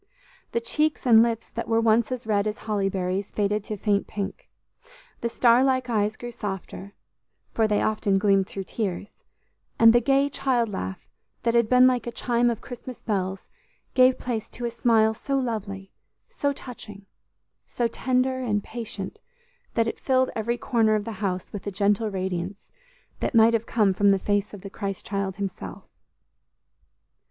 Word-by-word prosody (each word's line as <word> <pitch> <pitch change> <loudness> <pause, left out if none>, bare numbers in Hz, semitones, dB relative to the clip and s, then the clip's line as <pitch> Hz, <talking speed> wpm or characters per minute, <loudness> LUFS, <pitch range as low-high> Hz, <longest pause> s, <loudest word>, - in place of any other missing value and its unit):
The 235 - +1
cheeks 300 +6 0
and 225 -3 +7
lips 230 -1 -1
that 230 - -4
were 225 0 +2
once 225 +1 +3
as 255 -3 -4
red 210 -1 +1
as 215 +1 -3
holly 205 -4 -1
berries 190 +1 -2
faded 210 0 0
to 215 - -4
faint 200 0 0
pink; 210 - -5 0.7
the 235 - -2
star 240 +1 +4
like 255 -2 +1
eyes 215 -1 0
grew 240 0 -7
softer, 200 -2 -6 0.6
for 220 -1 +2
they 210 -1 +1
often 210 -2 +1
gleamed 195 -1 +3
through 195 - -5
tears; 200 -1 -5 0.5
and 230 0 +7
the 240 - +5
gay 275 +3 +3
child 255 -5 0
laugh, 95 - -5 0.4
that 230 - +2
had 235 -2 +3
been 250 0 +6
like 250 -1 +2
a - - -2
chime 240 0 +1
of 235 -1 -3
Christmas 250 0 -9
bells, 190 -3 -2 0.5
gave 255 0 +5
place 230 -3 -4
to 240 - -6
a 235 - -2
smile 225 -2 +3
so 275 +5 -2
lovely, 200 -6 -4 0.4
so 285 - -1
touching, 215 -7 -10 0.6
so 240 - 0
tender 260 +2 0
and 210 -5 -1
patient, 220 -4 -6 0.6
that 230 - +3
it - - -4
filled 260 -1 +2
every 235 +2 -1
corner 225 -3 +2
of 210 -1 -1
the 230 - -4
house 185 -3 -2
with 205 -1 -6
a - - -1
gentle 205 +3 +1
radiance 190 -1 -3 0.6
that - - -2
might 225 +1 +6
have 230 0 0
come 210 -4 +2
from 200 +1 +3
the 195 - +5
face 205 +1 0
of 205 - -10
the 195 - -8
Christ 195 -2 -5
child 195 -1 -2
himself. 200 -2 -6
220 Hz, 175 wpm, -25 LUFS, 200-240 Hz, 0.7 s, and